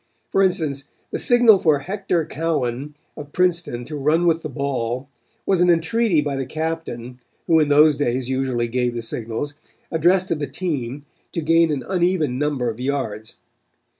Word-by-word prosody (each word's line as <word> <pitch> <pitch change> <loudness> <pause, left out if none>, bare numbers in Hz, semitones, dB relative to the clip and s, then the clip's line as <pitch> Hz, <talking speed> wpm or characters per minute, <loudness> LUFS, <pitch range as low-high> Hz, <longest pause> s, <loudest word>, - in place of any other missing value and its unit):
For 195 - +3
instance, 155 -7 0 0.3
the - - -2
signal 240 -5 +6
for 155 -4 +3
Hector 180 +1 -2
Cowan 145 -3 -2 0.2
of 145 -1 -9
Princeton 170 -9 0
to 150 - -7
run 150 +4 +2
with 165 -1 +2
the 155 - -5
ball 130 -2 -3 0.4
was 190 -3 +2
an 180 - +4
entreaty 170 +2 +2
by 145 -1 -2
the 135 - -2
captain, 155 -6 -4 0.3
who 165 -1 +4
in 150 - +3
those 150 0 +5
days 130 -3 -1
usually 130 -2 -1
gave 120 0 -1
the 120 - -4
signals, 115 +5 -4 0.4
addressed 175 +3 +2
to 170 - +1
the 150 -2 -3
team, 145 -6 -4 0.3
to 165 - -2
gain 165 +1 +3
an 140 -4 -2
uneven 175 -8 +1
number 145 -4 0
of 115 0 -3
yards. 125 -5 -3
150 Hz, 165 wpm, -22 LUFS, 130-165 Hz, 0.4 s, signal